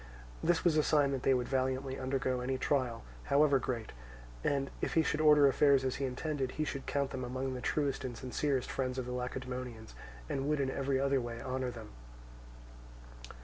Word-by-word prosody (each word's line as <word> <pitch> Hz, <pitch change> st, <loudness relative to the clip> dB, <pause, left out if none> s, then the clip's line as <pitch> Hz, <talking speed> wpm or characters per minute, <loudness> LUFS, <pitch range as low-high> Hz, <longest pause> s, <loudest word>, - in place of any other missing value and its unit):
This 170 Hz, 0 st, +2 dB
was 165 Hz, -3 st, +3 dB
a -, -, +6 dB
sign 145 Hz, -2 st, +3 dB
that 135 Hz, -2 st, -2 dB
they 135 Hz, -, +3 dB
would 125 Hz, -1 st, -1 dB
valiantly 130 Hz, 0 st, -1 dB
undergo 130 Hz, -1 st, -1 dB
any 130 Hz, +1 st, -1 dB
trial, 130 Hz, -4 st, 0 dB, 0.2 s
however 140 Hz, -1 st, +4 dB
great; 120 Hz, -3 st, -3 dB, 0.5 s
and 135 Hz, -1 st, 0 dB
if -, -, -2 dB
he 160 Hz, -, +5 dB
should 155 Hz, -, 0 dB
order 150 Hz, -2 st, +7 dB
affairs 140 Hz, 0 st, +4 dB
as 130 Hz, -, -1 dB
he 135 Hz, -, -1 dB
intended, 135 Hz, 0 st, -2 dB
he 155 Hz, -, -1 dB
should 140 Hz, -3 st, -4 dB
count 140 Hz, -1 st, 0 dB
them 130 Hz, -, -4 dB
among 130 Hz, +1 st, -3 dB
the 125 Hz, -, -5 dB
truest 140 Hz, 0 st, 0 dB
and 125 Hz, -3 st, -5 dB
sincerest 130 Hz, +1 st, -1 dB
friends 130 Hz, -1 st, -2 dB
of 130 Hz, -, -2 dB
the 125 Hz, -, -5 dB
Lacedaemonians, 125 Hz, -2 st, -5 dB, 0.3 s
and 135 Hz, +1 st, -2 dB
would 150 Hz, -1 st, +1 dB
in 135 Hz, -1 st, 0 dB
every 135 Hz, -1 st, 0 dB
other 140 Hz, -1 st, +2 dB
way 120 Hz, -1 st, -5 dB
honour 130 Hz, -1 st, -2 dB
them. 115 Hz, -3 st, -9 dB
130 Hz, 190 wpm, -33 LUFS, 125-140 Hz, 0.5 s, order